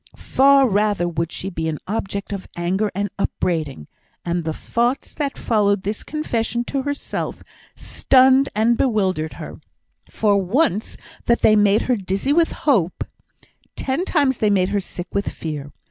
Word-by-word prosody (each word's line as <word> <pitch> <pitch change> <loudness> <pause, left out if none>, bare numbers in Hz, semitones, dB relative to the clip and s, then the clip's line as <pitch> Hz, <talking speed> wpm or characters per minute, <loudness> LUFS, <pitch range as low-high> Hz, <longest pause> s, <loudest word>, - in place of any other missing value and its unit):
far 275 0 +4
rather 205 -4 +1
would 165 -1 -2
she 190 - -5
be 160 -4 -3
an 155 -1 -2
object 200 -1 -3
of 195 -2 -6
anger 185 +5 0
and 200 0 -2
upbraiding; 155 - -2 0.4
and 170 -1 -1
the 160 - -1
thoughts 240 - -1
that 285 -3 -3
followed 205 -3 +1
this 205 +2 -3
confession 240 -6 -2
to 270 +2 -2
herself, 285 +1 -4 0.3
stunned 265 +1 +4
and 225 +2 +3
bewildered 190 - 0
her; - - -8
and - - -14 0.5
for 205 -2 +2
once 210 - 0 0.3
that 235 - +2
they 215 - +6
made 205 0 +4
her 250 - +1
dizzy 195 +8 -1
with 330 +1 +3
hope, 200 - +2 0.7
ten 270 +6 -1
times 285 -9 +1
they 215 - +3
made 190 -2 +2
her 205 0 0
sick 175 -1 -7
with 200 +1 0
fear. 145 -3 -6
205 Hz, 160 wpm, -21 LUFS, 185-255 Hz, 0.7 s, they